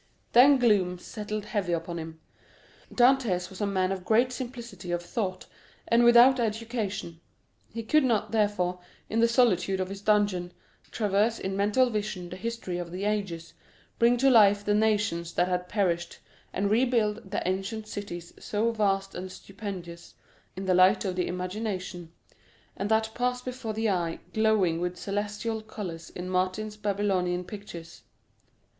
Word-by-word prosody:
Then 270 Hz, +4 st, +8 dB
gloom 200 Hz, -7 st, +2 dB
settled 210 Hz, +2 st, -5 dB
heavily 205 Hz, -5 st, -1 dB
upon 170 Hz, +1 st, -5 dB
him. 160 Hz, 0 st, -8 dB, 0.7 s
Dantès 240 Hz, -9 st, +3 dB
was 190 Hz, -, -9 dB
a 205 Hz, -, +1 dB
man 190 Hz, -1 st, 0 dB
of 190 Hz, -1 st, -3 dB
great 235 Hz, +6 st, +3 dB
simplicity 240 Hz, -7 st, -7 dB
of 175 Hz, 0 st, -1 dB
thought, 185 Hz, 0 st, -3 dB, 0.4 s
and 235 Hz, +1 st, +4 dB
without 240 Hz, +2 st, +7 dB
education; 215 Hz, -6 st, -3 dB, 0.5 s
he 230 Hz, +1 st, -5 dB
could 305 Hz, +7 st, +3 dB
not, 220 Hz, -4 st, +1 dB
therefore, 205 Hz, -5 st, +1 dB, 0.3 s
in 225 Hz, -, +1 dB
the 230 Hz, -, +5 dB
solitude 195 Hz, -6 st, +2 dB
of 185 Hz, 0 st, -2 dB
his 195 Hz, 0 st, -7 dB
dungeon, 205 Hz, -4 st, +1 dB, 0.4 s
traverse 210 Hz, +2 st, +1 dB
in 190 Hz, 0 st, -3 dB
mental 210 Hz, +6 st, +2 dB
vision 210 Hz, -4 st, -3 dB
the 180 Hz, -, -7 dB
history 210 Hz, -4 st, -4 dB
of 170 Hz, -1 st, -6 dB
the 185 Hz, +2 st, -5 dB
ages, 195 Hz, -6 st, -2 dB, 0.5 s
bring 235 Hz, +1 st, +4 dB
to 270 Hz, +2 st, +4 dB
life 205 Hz, -3 st, +5 dB
the 205 Hz, -, +2 dB
nations 210 Hz, -6 st, +1 dB
that 175 Hz, -, +2 dB
had 180 Hz, 0 st, -2 dB
perished, 175 Hz, -5 st, -1 dB, 0.3 s
and 200 Hz, +1 st, -1 dB
rebuild 225 Hz, -3 st, +1 dB
the 200 Hz, -, -2 dB
ancient 195 Hz, +4 st, -3 dB
cities 175 Hz, -5 st, -7 dB
so 220 Hz, +2 st, 0 dB
vast 195 Hz, -3 st, 0 dB
and 185 Hz, +1 st, -6 dB
stupendous 185 Hz, -4 st, -8 dB, 0.4 s
in 190 Hz, +1 st, -5 dB
the 185 Hz, -, +2 dB
light 185 Hz, +3 st, +5 dB
of 185 Hz, -2 st, -2 dB
the 180 Hz, -, 0 dB
imagination, 185 Hz, -2 st, -4 dB, 0.6 s
and 200 Hz, +2 st, -3 dB
that 220 Hz, 0 st, +2 dB
pass 250 Hz, +1 st, 0 dB
before 250 Hz, -3 st, -5 dB
the 220 Hz, +1 st, -1 dB
eye 175 Hz, -4 st, 0 dB, 0.2 s
glowing 210 Hz, -7 st, +2 dB
with 180 Hz, 0 st, -2 dB
celestial 210 Hz, +3 st, -3 dB
colors 185 Hz, -7 st, -7 dB
in 180 Hz, 0 st, -7 dB
Martin's 185 Hz, +4 st, -1 dB
Babylonian 195 Hz, -4 st, 0 dB
pictures. 180 Hz, -4 st, -10 dB
205 Hz, 155 wpm, -28 LUFS, 180-220 Hz, 0.7 s, Then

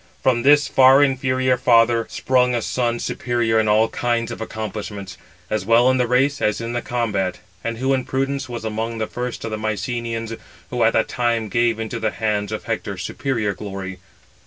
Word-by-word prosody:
From 125 Hz, -2 st, +3 dB
this 145 Hz, +3 st, +5 dB
far 135 Hz, +2 st, +6 dB
inferior 130 Hz, -1 st, +1 dB
father 115 Hz, -1 st, +3 dB
sprung 125 Hz, -1 st, +1 dB
a 115 Hz, -, -1 dB
son 120 Hz, -2 st, 0 dB
superior 120 Hz, -2 st, 0 dB
in 110 Hz, -, +1 dB
all 110 Hz, +1 st, +4 dB
kinds 120 Hz, 0 st, -1 dB
of 115 Hz, -, -7 dB
accomplishments, 105 Hz, -3 st, -6 dB, 0.3 s
as 110 Hz, -2 st, -1 dB
well 115 Hz, +5 st, +5 dB
in 130 Hz, -, +1 dB
the 125 Hz, -1 st, +1 dB
race 135 Hz, +3 st, +2 dB
as 105 Hz, -, +1 dB
in 115 Hz, +1 st, -4 dB
the 120 Hz, -, -1 dB
combat, 100 Hz, -8 st, -1 dB, 0.3 s
and 115 Hz, 0 st, -3 dB
who 130 Hz, +3 st, +1 dB
in 130 Hz, -1 st, 0 dB
prudence 135 Hz, 0 st, -2 dB
was 120 Hz, -2 st, -5 dB
among 110 Hz, +1 st, -3 dB
the 110 Hz, -, -1 dB
first 125 Hz, +1 st, -5 dB
of 115 Hz, -, -4 dB
the 110 Hz, -, -2 dB
Mycenæans, 115 Hz, +1 st, -3 dB, 0.3 s
who 120 Hz, -2 st, +1 dB
at 115 Hz, -, +4 dB
that 115 Hz, -, +2 dB
time 115 Hz, -3 st, -1 dB
gave 115 Hz, +1 st, +1 dB
into 115 Hz, +1 st, -4 dB
the 110 Hz, -1 st, 0 dB
hands 105 Hz, -2 st, -2 dB
of 110 Hz, -, -4 dB
Hector 105 Hz, -3 st, -3 dB
superior 115 Hz, +2 st, -2 dB
glory. 95 Hz, -1 st, -7 dB
115 Hz, 190 wpm, -21 LUFS, 110-125 Hz, 0.3 s, far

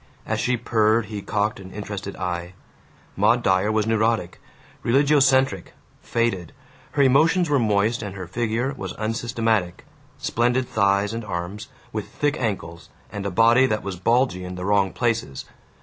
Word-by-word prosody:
As -, -, -2 dB
she 125 Hz, 0 st, +1 dB
purred 110 Hz, -1 st, +2 dB
he 105 Hz, -, -4 dB
cocked 105 Hz, +1 st, -1 dB
an 95 Hz, -1 st, -11 dB
interested 100 Hz, -1 st, -6 dB
eye. 90 Hz, 0 st, -4 dB, 0.6 s
Maud -, -, +3 dB
Dyer 95 Hz, +3 st, +2 dB
was 110 Hz, -1 st, +1 dB
neurotic, 110 Hz, -4 st, 0 dB, 0.4 s
religiocentric, 135 Hz, -5 st, +3 dB, 0.3 s
faded; 115 Hz, -8 st, -1 dB, 0.4 s
her 140 Hz, -, +3 dB
emotions 155 Hz, +6 st, +3 dB
were 140 Hz, -, +4 dB
moist, 110 Hz, +1 st, +1 dB
and 100 Hz, -3 st, -6 dB
her 95 Hz, -2 st, -6 dB
figure 120 Hz, +7 st, -1 dB
was -, -, -6 dB
unsystematic 115 Hz, -4 st, -1 dB, 0.3 s
splendid 125 Hz, +2 st, 0 dB
thighs 100 Hz, 0 st, +1 dB
and 115 Hz, 0 st, -4 dB
arms, 100 Hz, +2 st, -5 dB, 0.3 s
with -, -, -4 dB
thick 145 Hz, 0 st, -1 dB
ankles, 95 Hz, -8 st, -4 dB, 0.2 s
and 100 Hz, -1 st, -4 dB
a -, -, -1 dB
body 115 Hz, +7 st, +5 dB
that 110 Hz, -3 st, -1 dB
was 100 Hz, -1 st, -4 dB
bulgy 115 Hz, 0 st, +1 dB
in 90 Hz, 0 st, -6 dB
the 90 Hz, 0 st, -5 dB
wrong 100 Hz, -2 st, +2 dB
places. 115 Hz, -, -2 dB
110 Hz, 150 wpm, -23 LUFS, 95-120 Hz, 0.6 s, body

